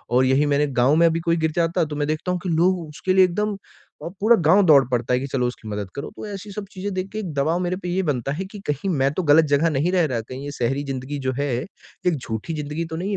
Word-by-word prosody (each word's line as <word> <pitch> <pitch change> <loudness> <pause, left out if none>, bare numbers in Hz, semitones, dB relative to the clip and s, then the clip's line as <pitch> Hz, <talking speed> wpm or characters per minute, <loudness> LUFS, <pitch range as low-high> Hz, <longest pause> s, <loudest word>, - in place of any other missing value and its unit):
और 130 +1 +5
यही 135 +3 +3
मैंने 145 0 +2
गाँव 135 +5 +4
में 170 +1 +5
अभी 165 0 +1
कोई 170 0 +1
गिर 160 -1 0
जाता 170 0 +1
तो 150 - -6
मैं 145 0 -1
देखता 155 +4 -2
हूँ 180 - -2
कि 180 - -2
लोग 175 +3 +2
उसके 170 +5 -2
लिए 190 0 +6
एकदम 210 +4 -1 0.5
अ, - - -4
पूरा 230 +3 +6
गाँव 195 +5 +6
दौड़ 145 -5 +7
पड़ता 125 0 0
है 125 - +3
कि 135 - -4
चलो 130 -2 0
उसकी 120 -2 -7
मदद 105 -2 -4
करो 140 - -5
तो - - -6
ऐसी 205 0 -7
सब 200 +1 -6
चीज़ें 195 +1 -5
देख 185 +1 -3
के 215 - -3
एक 185 -7 -5
दबाव 155 +5 +1
मेरे 180 0 -1
पे 180 -2 -6
ये 185 +2 0
बनता 130 +1 -3
है 185 +6 -4
कि 210 - -8
कहीं 150 +7 -3
मैं 140 -5 +2
तो 185 - -2
गलत 155 +1 +5
जगह 165 +4 +2
नहीं 155 +4 0
रह 180 -3 +3
रहा, 125 -5 -2
कहीं 130 +5 -8
ये 145 - -5
शहरी 135 +4 0
ज़िंदगी 135 +1 -4
जो 130 - +1
है 145 -1 0 0.6
एक 175 - +3
झूठी 115 +5 -5
ज़िंदगी 150 +2 -3
तो 160 - -6
नहीं 185 +5 -3
155 Hz, 285 wpm, -22 LUFS, 140-180 Hz, 0.6 s, दौड़